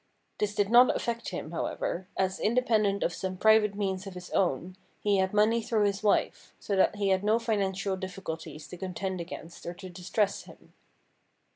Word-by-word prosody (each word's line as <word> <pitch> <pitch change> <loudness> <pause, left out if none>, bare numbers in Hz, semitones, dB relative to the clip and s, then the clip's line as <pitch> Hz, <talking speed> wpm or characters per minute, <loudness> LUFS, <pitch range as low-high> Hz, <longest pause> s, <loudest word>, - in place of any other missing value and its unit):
This 210 0 -1
did 205 +1 +1
not 245 +1 +7
affect 235 0 -2
him, 170 -3 -5
however, 175 +2 -3
as, 190 0 0
independent 215 -4 +2
of 170 - 0
some 185 +1 -4
private 220 0 +4
means 190 -1 -2
of 190 - -8
his 180 0 -9
own, 180 +1 0 0.2
he 205 -1 +2
had 190 0 +1
money 215 +3 +3
through 220 -2 +1
his 200 -1 0
wife, 210 -1 0
so 200 - -2
that 190 +2 +3
he 200 -1 0
had 190 0 +2
no 215 +2 +3
financial 200 -4 -1
difficulties 180 -4 -6
to 180 - -8
contend 185 0 -3
against 170 -1 -9
or 175 - -5
to 185 +1 -9
distress 185 +3 -1
him. - - -16
195 Hz, 180 wpm, -29 LUFS, 185-210 Hz, 0.2 s, not